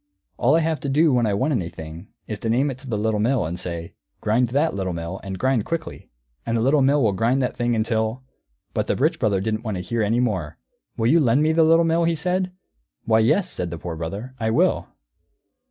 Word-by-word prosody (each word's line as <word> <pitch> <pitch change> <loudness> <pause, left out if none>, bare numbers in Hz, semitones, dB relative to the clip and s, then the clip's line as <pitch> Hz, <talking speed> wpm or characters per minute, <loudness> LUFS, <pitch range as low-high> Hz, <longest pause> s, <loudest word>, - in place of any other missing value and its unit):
All 135 +6 +3
I 165 - +3
have 160 -1 0
to 140 - -4
do 150 +2 +3
when 120 -2 +2
I 100 - +1
want 130 +9 0
anything 85 - -5 0.2
is 105 -2 -5
to 115 - -3
name 135 +5 +2
it 130 - -9
to 135 -1 -11
the 110 - -1
Little 105 0 0
Mill, 120 0 +1
and 85 +3 -4
say, 85 -1 -5 0.3
'Grind 115 +3 +1
that, 145 +6 +1
Little 95 -2 -2
Mill, 85 +3 -5
and 95 -1 -5
grind 130 -2 +1
quickly,' 165 +3 -5 0.3
and 115 0 -1
the - - 0
Little 135 +4 +3
Mill 140 +1 +3
will 110 - +3
grind 115 +7 +1
that 125 - -2
thing 120 -1 0
until 110 +2 -1 0.3
" - - -48
But - - -1
the - - +1
Rich - - +1
Brother 100 -3 +1
didn't 110 +2 -2
wait 110 -3 -3
to - - -3
hear 115 +6 -2
any 110 +3 +1
more. 95 -11 -1 0.4
"Will 115 - 0
you 160 +8 +5
lend 135 0 +3
me 155 - +3
the 165 +1 +3
Little 165 +1 +5
Mill?" 165 +1 +2
he 165 0 +1
said. 180 +4 0 0.5
"Why, 110 0 +4
yes," 130 - +3
said 90 -1 -3
the 85 - -5
Poor 85 0 -6
Brother, 100 +11 -5
"I 110 -1 0
will." 115 - +2
115 Hz, 240 wpm, -23 LUFS, 100-140 Hz, 0.5 s, you